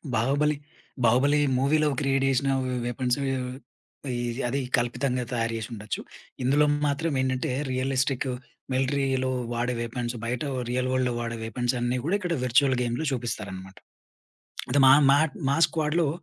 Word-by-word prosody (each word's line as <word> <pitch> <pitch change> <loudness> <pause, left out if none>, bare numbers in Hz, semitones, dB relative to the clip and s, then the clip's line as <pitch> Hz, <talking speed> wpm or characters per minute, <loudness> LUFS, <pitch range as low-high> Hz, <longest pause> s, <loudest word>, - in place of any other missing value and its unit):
'బాహుబలి', 140 +6 +2 0.5
'బాహుబలి' 135 +6 +4 0.2
మూవీ‌లో 150 +3 +3
క్రియేట్ 135 -1 +1
జేసిన 135 +1 +1 0.4
వెపన్స్ 125 +1 0 0.9
ఇ 120 -1 -2 0.3
అది 135 +3 -1 0.2
కల్పితంగా 125 +1 -1
తయారు 115 -1 0
జేసుండొచ్చు. 110 -2 -5 0.4
ఇందులో 145 +4 +4 0.2
మాత్రం 150 +3 -1
ఏంటంటే 130 -1 -1 0.2
రియలిస్టిక్ 130 +1 0 0.5
మిలిటరీ‌లో 130 0 +1 0.2
వాడే 120 +1 -1
వెపన్స్ 120 +1 -3
బయట 120 +1 -2 0.3
రియల్ 130 +1 0
వరల్డ్‌లో 125 -1 +1
వాడే 115 -1 -3
వెపన్స్ 120 +2 -1
అన్నీ 120 +1 0
గూడా 195 +5 +2
ఇక్కడ 180 -4 -2
వర్చువల్ 130 +2 +3
గేమ్‌లో 120 +6 -1
చూపిస్తారన్నమాట. 100 -6 -5 0.9
అంటే 140 +3 +3
మా 130 - +9 0.2
మాట్ 145 0 +3
మా 140 - +2
స్క్వాడ్‌లో 160 0 0
130 Hz, 125 wpm, -26 LUFS, 120-140 Hz, 0.9 s, మా